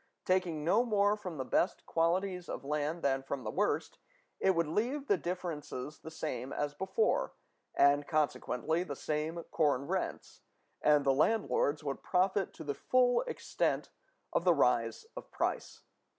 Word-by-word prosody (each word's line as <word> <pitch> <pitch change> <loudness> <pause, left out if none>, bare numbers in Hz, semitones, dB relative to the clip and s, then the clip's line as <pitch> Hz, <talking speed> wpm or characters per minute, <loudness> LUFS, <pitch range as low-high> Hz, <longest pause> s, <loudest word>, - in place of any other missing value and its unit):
Taking 180 -5 +1
no 210 +8 +4
more 205 -3 +3
from 180 -6 -7
the 130 - -3
best 175 +8 0
qualities 180 +2 0
of - - -5
land 150 +3 -2
than 135 -1 +2
from 135 -1 -5
the - - -3
worst, 205 +3 -1 0.4
it 190 -1 +3
would 170 0 +2
leave 245 - -1
the 205 - +3
differences 160 -6 -5
the - - -9
same 135 -5 -4
as 145 0 -2
before, 445 - 0 0.4
and 145 +1 +4
consequently 155 0 0
the 150 -6 -4
same 155 +4 -3
corn 145 -4 +2
rents, 185 +4 -3 0.4
and 150 -1 +4
the 135 - +4
landlords 155 -2 +1
would 140 -2 -3
profit 190 +1 +1
to - - -8
the 145 -2 -2
full 250 - +3
extent 475 - -1 0.4
of - - +1
the 175 -2 +5
rise 120 -5 +2
of - - -8
price. - - -3
160 Hz, 155 wpm, -32 LUFS, 145-190 Hz, 0.4 s, the